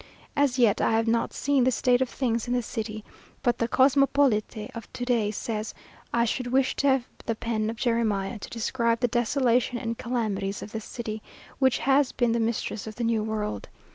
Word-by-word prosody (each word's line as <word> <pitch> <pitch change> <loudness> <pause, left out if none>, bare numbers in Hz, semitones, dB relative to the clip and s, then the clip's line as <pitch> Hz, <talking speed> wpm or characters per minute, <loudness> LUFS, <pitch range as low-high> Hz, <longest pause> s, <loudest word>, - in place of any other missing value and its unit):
As 285 -3 +2
yet, 235 -5 +4
I - - +2
have 225 +1 +2
not 230 0 +1
seen 280 -2 +1
the 255 - +4
state 250 0 +2
of 260 - +1
things 235 -3 -1
in 245 - 0
the 245 - 0
city, 215 -1 -5 0.4
but 240 -1 +1
the 230 - +1
"Cosmopolite" 265 -5 +2
of 230 -2 -9
to 245 - -4
day 235 -4 +2
says 215 0 -4 0.4
"I 235 0 +2
should 245 +2 -2
wish 260 +1 +2
to 280 - +2
have 265 -2 +3 0.2
the 230 - 0
pen 220 -1 -1
of 225 - -4
Jeremiah, 220 -3 0
to - - -8
describe 230 0 0
the 245 - +3
desolation 245 +1 +1
and 230 -1 -4
calamities 210 -5 -2
of 210 - -9
this 220 -1 -5
city, 220 -2 -5 0.4
which 260 -2 +4
has 270 +2 +2
been 240 -2 +1
the 235 - +1
mistress 225 -2 -2
of 215 - -7
the 240 - -3
new 230 -1 +1
world. 210 - -3
235 Hz, 200 wpm, -26 LUFS, 220-250 Hz, 0.4 s, yet